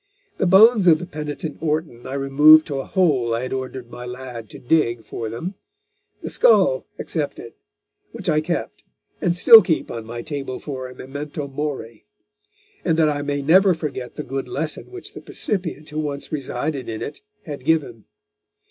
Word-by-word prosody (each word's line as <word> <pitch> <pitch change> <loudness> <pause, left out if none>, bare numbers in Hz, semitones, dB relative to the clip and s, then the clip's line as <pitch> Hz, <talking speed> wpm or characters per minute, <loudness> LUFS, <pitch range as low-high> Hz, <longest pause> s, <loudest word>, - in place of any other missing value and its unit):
The 190 - +2
bones 205 +2 +6
of 160 -2 +7
the 175 - -6
penitent 150 -1 -6
Orton 155 -6 -2
I 135 - -4
removed 150 +3 +6
to 140 -3 -3
a 135 - -4
hole 135 -11 +1
I 115 - -3
had 130 - -4
ordered 130 -2 -5
my 125 - -8
lad 125 -3 -8
to - - -10
dig 120 -5 +1
for 115 0 -5
them; 140 - -5 0.7
the - - -4
skull - - +4
excepted, - - -4 0.6
which - - -8
I 155 -2 +3
kept, 170 +2 -3 0.4
and 175 -2 +1
still 225 +4 +10
keep 165 -7 -1
on 115 - -5
my 120 +1 -6
table 140 -4 -5
for 130 -3 -6
a 125 - -12
memento 145 +2 -6
mori; 135 - -5 0.8
and 165 -3 +1
that 160 -2 +4
I 145 -1 -1
may 145 -1 -2
never 185 +5 +5
forget 140 -6 -5
the - - -5
good 135 0 -4
lesson 155 +2 -4
which 375 0 -9
the - - -9
percipient 165 -7 -4
who 155 - -3
once 145 -2 -4
resided 140 -1 -3
in 110 -1 -4
it 145 - -7 0.2
had 145 -4 -7
given. 145 -7 0
145 Hz, 175 wpm, -22 LUFS, 130-160 Hz, 0.8 s, still